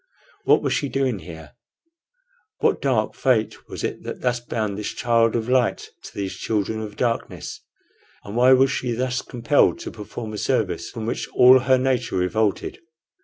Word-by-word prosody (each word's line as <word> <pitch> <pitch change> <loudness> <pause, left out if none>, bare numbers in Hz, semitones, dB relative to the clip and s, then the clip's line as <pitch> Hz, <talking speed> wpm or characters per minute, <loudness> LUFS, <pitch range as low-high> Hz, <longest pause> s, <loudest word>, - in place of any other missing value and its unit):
What - - +4
was - - +1
she 140 - -1
doing 130 -6 0
here? 80 -2 -11 1.1
What - - +1
dark 120 -6 +1
fate 115 -5 0
was - - -6
it - - -3
that - - -7
thus 125 -1 0
bound 110 -4 -3
this 105 0 -4
child 115 -1 +2
of 115 -1 -1
light 125 -1 +1 0.2
to - - -11
these 100 -2 -3
children 110 0 -2
of 105 -1 -7
darkness? 115 0 -3 0.6
or 100 - -7
why 125 +3 +6
was 130 +1 +4
she 125 -3 -2
thus 125 +1 -1
compelled 125 +4 +2
to - - -6
perform 110 +1 -7
a 105 - -4
service - - -1
from 110 - -6
which 115 - -3
all 130 +1 +8
her 130 +1 +3
nature 125 -4 0
revolted? 100 +3 0
115 Hz, 170 wpm, -23 LUFS, 110-125 Hz, 1.1 s, all